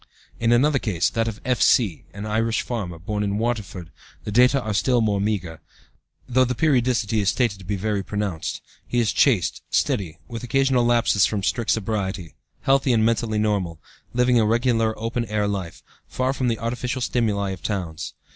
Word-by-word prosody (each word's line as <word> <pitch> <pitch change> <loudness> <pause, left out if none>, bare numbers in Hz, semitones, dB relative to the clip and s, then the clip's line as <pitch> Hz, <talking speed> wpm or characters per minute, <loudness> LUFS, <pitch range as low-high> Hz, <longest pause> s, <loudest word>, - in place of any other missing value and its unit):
In 115 0 +2
another 135 +4 +4
case, 90 -9 0
that 115 0 0
of 110 -2 -4
F.C., 115 - +2
an 100 +2 -7
Irish 110 +1 0
farmer, 100 -9 -4
born 105 +5 -3
in 100 0 -1
Waterford, 100 -7 -3 0.3
the 105 - -5
data 125 +5 +5
are 110 -4 -3
still 120 +4 +2
more 105 -3 +1
meagre, 95 -7 -2 0.7
though 130 +1 +3
the 125 0 -1
periodicity 120 -7 +2
is 100 -2 +2
stated 115 -6 0
to 95 - -12
be 100 +2 -2
very 105 +1 -1
pronounced. 100 -4 -4 0.2
He 120 - 0
is 115 -3 +2
chaste, 110 - +2
steady, 85 -5 0
with 115 +1 -7
occasional 135 -1 +2
lapses 115 -5 +3
from 105 -3 -3
strict 115 +2 -1
sobriety, 95 -5 -1 0.3
healthy 135 -1 +3
and 110 -1 +3
mentally 115 -1 0
normal, 100 -6 -1 0.3
living 125 0 +3
a 110 - +3
regular 115 -1 +1
open 115 +2 -2
air 105 -1 -1
life, 95 -5 -4 0.2
far 130 +1 -1
from 130 -2 -1
the 115 -2 0
artificial 125 +3 -3
stimuli 105 -5 0
of 95 -2 -7
towns. 90 -5 -4
110 Hz, 175 wpm, -23 LUFS, 100-120 Hz, 0.7 s, data